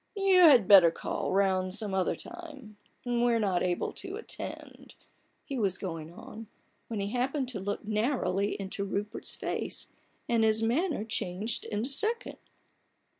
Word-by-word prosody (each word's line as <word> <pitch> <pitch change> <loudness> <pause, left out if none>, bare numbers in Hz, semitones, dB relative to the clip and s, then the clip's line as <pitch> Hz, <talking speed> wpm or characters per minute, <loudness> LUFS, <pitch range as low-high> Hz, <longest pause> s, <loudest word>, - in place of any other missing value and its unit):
c( 390 -1 +3
You 365 - +7
had 250 - +7
better 190 -5 +9
call 165 - -3
round 190 -1 +1
some 210 -2 -2
other 190 -1 +1
time; 300 -11 -10 0.3
we're 240 -1 +2
not 195 -5 +1
able 180 -1 -1
to - - -6
attend—" - - -7 0.5
he 275 -3 -4
was 195 -4 +1
going 165 -4 -6
on, 220 +5 -10 0.4
when 225 -3 -4
he 200 0 -2
happened 260 +2 -1
to 230 -6 -4
look 205 +2 -4
narrowly 210 -3 0
into 195 0 -4
Rupert's 205 +2 -3
face, - - -4 0.4
and 230 -1 +2
his 220 0 +3
manner 290 - 0
changed 215 0 -3
in 210 0 -2
a - - -2
second. 440 - 0
215 Hz, 155 wpm, -29 LUFS, 195-250 Hz, 0.5 s, better